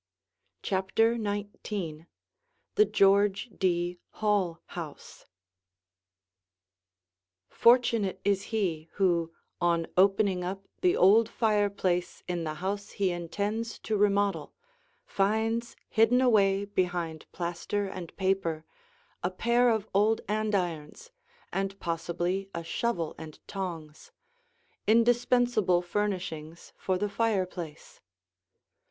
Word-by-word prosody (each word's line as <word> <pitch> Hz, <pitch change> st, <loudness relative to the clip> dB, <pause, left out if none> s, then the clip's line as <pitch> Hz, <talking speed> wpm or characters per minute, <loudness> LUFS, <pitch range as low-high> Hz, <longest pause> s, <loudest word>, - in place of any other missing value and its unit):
CHAPTER 195 Hz, +4 st, +2 dB
XIX 205 Hz, -6 st, -4 dB, 0.7 s
THE 425 Hz, -, +5 dB
GEORGE 200 Hz, -, +3 dB
D. 175 Hz, -1 st, 0 dB
HALL 200 Hz, -6 st, 0 dB
HOUSE -, -, -9 dB, 2.2 s
Fortunate 230 Hz, -5 st, +3 dB
is 200 Hz, -1 st, +1 dB
he 170 Hz, -8 st, -2 dB
who, 170 Hz, -4 st, +1 dB, 0.3 s
on 170 Hz, -1 st, +2 dB
opening 195 Hz, -1 st, +3 dB
up 195 Hz, +2 st, -5 dB, 0.2 s
the 365 Hz, -1 st, +3 dB
old 215 Hz, +5 st, +6 dB
fireplace 200 Hz, -5 st, 0 dB
in 175 Hz, -2 st, -2 dB
the 155 Hz, 0 st, -3 dB
house 200 Hz, +4 st, -4 dB
he 195 Hz, -3 st, +1 dB
intends 205 Hz, +6 st, -3 dB
to 220 Hz, -, -3 dB
remodel, 200 Hz, -5 st, +1 dB, 0.5 s
finds 220 Hz, +4 st, 0 dB
hidden 225 Hz, +2 st, +4 dB
away 200 Hz, -5 st, +3 dB
behind 175 Hz, -5 st, -2 dB
plaster 175 Hz, +4 st, -2 dB
and 185 Hz, -3 st, -8 dB
paper 185 Hz, -5 st, 0 dB, 0.6 s
a 175 Hz, -, 0 dB
pair 235 Hz, +6 st, +2 dB
of 220 Hz, -2 st, 0 dB
old 210 Hz, +3 st, +3 dB
andirons 205 Hz, -, -2 dB, 0.4 s
and 195 Hz, 0 st, -2 dB
possibly 175 Hz, +3 st, -2 dB
a 170 Hz, -, -3 dB
shovel 170 Hz, -2 st, -2 dB
and 160 Hz, -1 st, -9 dB
tongs, 165 Hz, -6 st, -6 dB, 0.8 s
indispensable 235 Hz, -4 st, +3 dB
furnishings 175 Hz, -4 st, -4 dB
for 185 Hz, -1 st, -1 dB
the 205 Hz, +3 st, -1 dB
fireplace. 190 Hz, -7 st, -3 dB
195 Hz, 100 wpm, -29 LUFS, 175-215 Hz, 2.2 s, old